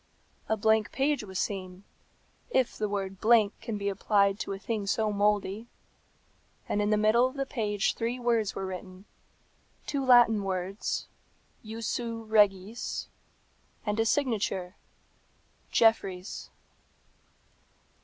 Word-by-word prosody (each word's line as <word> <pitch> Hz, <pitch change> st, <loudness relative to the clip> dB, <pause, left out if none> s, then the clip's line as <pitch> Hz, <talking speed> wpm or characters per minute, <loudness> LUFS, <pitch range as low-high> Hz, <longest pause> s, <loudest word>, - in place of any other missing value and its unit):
A 220 Hz, -, +2 dB
blank 220 Hz, 0 st, +2 dB
page 280 Hz, -1 st, 0 dB
was 190 Hz, -2 st, -7 dB
seen, 185 Hz, -1 st, -4 dB, 0.7 s
if 260 Hz, -, +1 dB
the 210 Hz, -1 st, -2 dB
word 195 Hz, -2 st, -3 dB
blank 220 Hz, -2 st, +5 dB
can 220 Hz, -2 st, -4 dB
be 200 Hz, 0 st, -3 dB
applied 200 Hz, 0 st, +2 dB
to -, -, -4 dB
a 195 Hz, -, -3 dB
thing 210 Hz, 0 st, -3 dB
so 215 Hz, +1 st, +1 dB
mouldy, 205 Hz, +1 st, 0 dB, 1.0 s
and 210 Hz, -, 0 dB
in 205 Hz, -, +1 dB
the 210 Hz, -, +3 dB
middle 215 Hz, +4 st, +4 dB
of 260 Hz, -, -9 dB
the 275 Hz, -1 st, -1 dB
page 210 Hz, -5 st, -1 dB
three 235 Hz, +2 st, -2 dB
words 230 Hz, -4 st, +1 dB
were 195 Hz, -, -3 dB
written, 185 Hz, +1 st, -8 dB, 0.8 s
two 280 Hz, -2 st, -2 dB
Latin 240 Hz, -5 st, +6 dB
words, 190 Hz, +1 st, -3 dB, 0.6 s
Jussu 230 Hz, +1 st, -4 dB
regis, 210 Hz, 0 st, +1 dB, 0.8 s
and 210 Hz, 0 st, -1 dB
a 225 Hz, -, +3 dB
signature, 210 Hz, -9 st, 0 dB, 0.9 s
Jeffreys. 195 Hz, -4 st, +1 dB
210 Hz, 125 wpm, -29 LUFS, 195-230 Hz, 1.0 s, Latin